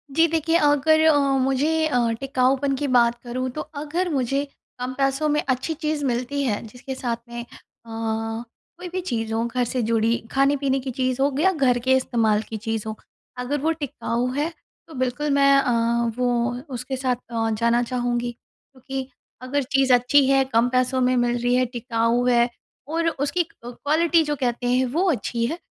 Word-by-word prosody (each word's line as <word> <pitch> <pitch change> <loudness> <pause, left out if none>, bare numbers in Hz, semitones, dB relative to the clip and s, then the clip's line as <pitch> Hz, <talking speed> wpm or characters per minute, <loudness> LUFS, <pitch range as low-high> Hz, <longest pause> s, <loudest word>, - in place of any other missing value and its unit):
जी। 330 +1 +5
देखिए 325 0 0
अगर 295 0 +4
अ, 315 -2 +6 0.2
मुझे 285 +5 +1
अ, 245 -5 +1
टिकाऊपन 270 +1 +1
की 285 +2 -2
बात 235 0 +4
करूँ 255 +1 -3
तो 305 - -2
अगर 305 +4 -3
मुझे 275 -1 0 0.4
कम 250 +1 -3
पैसों 275 +2 +1
में 300 0 +2
अच्छी 260 +4 -1
चीज़ 305 -1 -2
मिलती 255 +3 -1
है, 215 -6 -1
जिसके 250 +4 -8
साथ 240 -3 -2
में 240 0 -5
अ, - - -9 0.4
कोई 225 +8 -5
भी 370 +1 -3
चीज़ 225 -9 -3
हो 225 +1 0
घर 245 +1 -1
से 250 +1 -2
जुड़ी 225 +1 +2
खाने-पीने 275 0 +2
की 260 0 -5
चीज़ 255 +1 -1
हो 280 +1 +2
या 380 +4 +4
घर 265 -8 +2
के 260 +2 +3
इस्तेमाल 225 -4 +1
की 220 - -4
चीज़ 225 0 -3
हो। 220 - -4 0.4
अगर 255 +4 -2
वो 320 +2 +2
टिकाऊ 255 -5 -2
है, 295 +4 0 0.4
तो 320 - -13
बिल्कुल 260 +3 -1
मैं 275 0 +5
अ, 235 -2 +1
वो 245 -1 +1 0.2
उसके 255 +2 -4
साथ 255 -1 0 0.2
अ 225 -1 0
जाना 235 +1 +3
चाहूँगी। 245 -1 -1
क्योंकि 260 +2 -9 0.3
अगर 275 +3 -1
चीज़ 270 0 +2
अच्छी 250 +3 +4
है, 270 0 +4
कम 230 +2 +4
पैसों 255 +1 +1
में 255 0 +3
मिल 240 0 +1
रही 245 +1 +2
है, 255 0 +3
टिकाऊ 235 0 0
है 240 0 +4 0.4
और 330 +2 -1
उसकी 310 +4 -1
क 330 - -24
क्वालिटी 315 +7 +2
जो 295 -1 -2
कहते 245 -2 -2
हैं 250 +1 +2
वो 370 +3 +2
अच्छी 235 -2 -2
है, 325 +8 -3
255 Hz, 185 wpm, -23 LUFS, 240-285 Hz, 0.4 s, अ